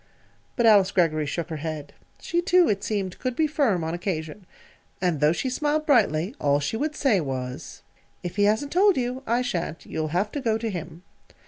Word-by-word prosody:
But 235 - +1
Alice 205 -4 +6
Greggory 155 -4 +1
shook 170 +3 -3
her 160 - -3
head. 150 -1 -5 0.3
She, 345 - -1
too, 360 -1 +4
it 200 -1 0
seemed, 195 -4 -3
could 255 -2 -2
be 315 - +2
firm, 270 - +1
on 160 +1 -2
occasion. 175 0 -4 0.5
And 175 -5 0
though 150 +1 +4
she 175 - -2
smiled 300 +4 0
brightly, 205 - +2
all 145 0 +2
she 145 +9 -2
would 300 +6 -2
say, 235 - +2
was: 130 0 -6 0.4
"If 175 0 -5
he 205 - +4
hasn't 220 +8 +1
told 390 +2 +4
you, 250 +1 -2
I 240 +2 +1
sha'n't. 170 -8 -3
You'll 155 -1 -3
have 180 +7 -1
to 285 - -4
go 225 -4 +1
to 225 -1 -3
him." 170 -1 -7
195 Hz, 200 wpm, -25 LUFS, 160-255 Hz, 0.5 s, Alice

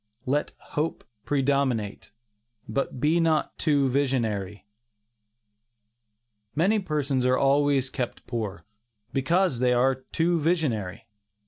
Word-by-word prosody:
LET 145 +3 0 0.2
HOPE 155 +2 -2 0.2
PREDOMINATE, 135 -7 0 0.6
BUT 130 +3 -2
BE 155 +6 +3
NOT 160 -2 +1
TOO 145 -3 +3
VISIONARY. 115 -8 -1 1.9
Many 195 +8 +3
persons 145 -7 -1
are 125 0 +3
always 140 -1 +2
kept 125 -2 -4
poor, 105 -8 -4 0.5
because 165 +1 +2
they 125 0 +3
are 130 +2 +3
too 165 +6 -1
visionary. 145 - -1
135 Hz, 100 wpm, -26 LUFS, 125-150 Hz, 1.9 s, BE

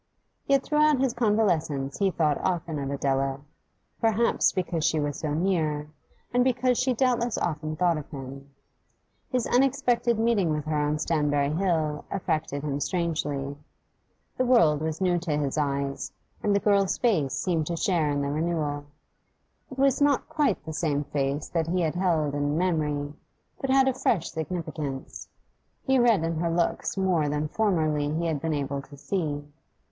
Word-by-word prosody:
Yet 275 -1 +3
throughout 300 -2 +3
his 265 -2 +1
convalescence 180 - 0
he 200 -1 +3
thought 155 -5 +1
often 165 -4 -2
of 135 -1 -3
Adela, 135 -1 -1 0.6
perhaps 225 +1 +2
because 175 -3 -2
she 155 - +2
was 145 -1 -2
so 150 -2 -2
near, 155 -4 0 0.4
and 245 0 +4
because 250 -1 +2
she 255 +1 +2
doubtless 240 -2 +1
often 155 -1 -2
thought 175 -2 +2
of 145 - -10
him. 135 -1 -8 0.8
His 250 -3 0
unexpected 245 -2 +2
meeting 220 -6 +2
with 150 -1 -1
her 155 0 -1
on 150 0 +1
Stanbury 150 -3 +1
Hill 160 -4 0
affected 155 -6 -2
him 145 -2 -2
strangely: 145 -5 -2 0.8
the 255 - +2
world 195 - +4
was 160 +2 -3
new 180 -2 +2
to 165 -4 -1
his 140 -2 -1
eyes, 140 -2 -2 0.3
and 205 -1 +2
the - - +4
girl's 200 -2 +2
face 170 - +1
seemed 165 -5 0
to 170 - -2
share 170 -6 +1
in 145 -1 0
the 140 - -1
renewal; 150 -2 -1 0.8
it 260 - -10
was 275 0 +3
not 285 -2 +3
quite 300 -9 0
the 160 - -5
same 150 -2 0
face 140 0 -2
that 165 -2 -1
he 180 +2 0
had 160 -2 0
held 165 -5 +1
in 145 +1 0
memory, 150 -5 0 0.5
but 270 - -3
had 265 0 +5
a 265 - +3
fresh 205 -8 0
significance. 155 -4 -5 0.5
He 265 -1 +3
read 230 -8 +4
in 165 0 -1
her 170 0 0
looks 170 +3 -1
more 180 -6 +2
than 150 +1 -1
formerly 155 -8 +1
he 165 +2 -1
had 155 -4 -1
been 160 -2 -1
able 140 -1 -2
to 140 +1 -14
see. 145 -3 -2
160 Hz, 165 wpm, -26 LUFS, 145-200 Hz, 0.8 s, had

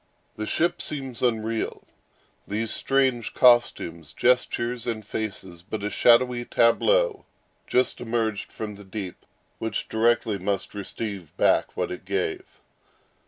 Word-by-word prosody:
The 110 0 -4
ship 170 +2 0
seems 135 -5 -4
unreal; 115 -2 -1 0.6
these 110 +2 -2
strange 130 -4 +1
costumes, 85 - +3
gestures, 125 -1 +1
and 110 -3 -3
faces, 100 -5 -5
but 100 +3 -6
a 105 - -2
shadowy 120 0 +4
tableau 430 - +2 0.4
just 125 +1 +1
emerged 115 -3 -1
from 105 -2 -6
the 105 - -11
deep, 95 -2 -7 0.3
which 115 - -3
directly 110 -2 +2
must 100 +1 -2
receive 100 -3 -6
back - - +2
what - - -1
it 90 - -6
gave. 95 -3 -3
110 Hz, 120 wpm, -25 LUFS, 100-120 Hz, 0.6 s, shadowy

